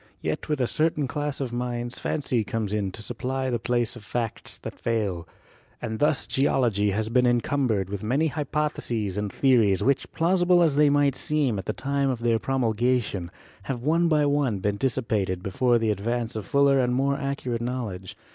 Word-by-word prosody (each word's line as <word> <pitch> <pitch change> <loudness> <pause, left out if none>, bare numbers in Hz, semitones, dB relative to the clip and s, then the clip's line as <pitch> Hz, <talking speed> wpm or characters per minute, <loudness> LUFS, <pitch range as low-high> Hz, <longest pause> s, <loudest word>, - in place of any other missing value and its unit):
Yet - - -3
with 150 -2 0
a 125 - +2
certain 155 +1 0
class 145 +1 -3
of 130 -4 -3
minds 120 0 -3
fancy 135 -6 -1
comes 105 0 -3
in 100 -3 -1
to 110 - -8
supply 130 +3 -3
the 120 - 0
place 120 0 0
of 120 - -11
facts 115 +1 -4
that - - -9
fail. 100 -7 -1 0.5
And 110 0 -4
thus 150 -1 +2
Geology 120 -6 +1
has 105 +2 -1
been 125 +1 +3
encumbered 120 - +1
with 100 0 -5
many 135 +9 +1
hypotheses 145 - -2
and 105 -1 -2
theories 115 -9 +3
which, 135 0 +1
plausible 175 +1 +3
as 155 -4 +2
they 150 0 +5
might 145 -1 +3
seem 140 -9 0
at 95 - -6
the - - -1
time 140 +2 -1
of 125 -3 -2
their 115 -1 +2
promulgation, 120 -6 0 0.4
have 125 -3 -4
one 165 +4 +3
by 150 -2 +3
one 140 -6 +1
been 100 +1 -2
dissi 130 -2 -1
pated 95 -4 -1
before 120 +5 +2
the 115 -2 +1
advance 115 +3 -2
of 105 -3 -5
fuller 140 -1 +4
and 125 -1 +1
more 140 +2 +1
accurate 140 -4 -3
knowledge. 115 -7 -4
125 Hz, 185 wpm, -25 LUFS, 110-140 Hz, 0.5 s, they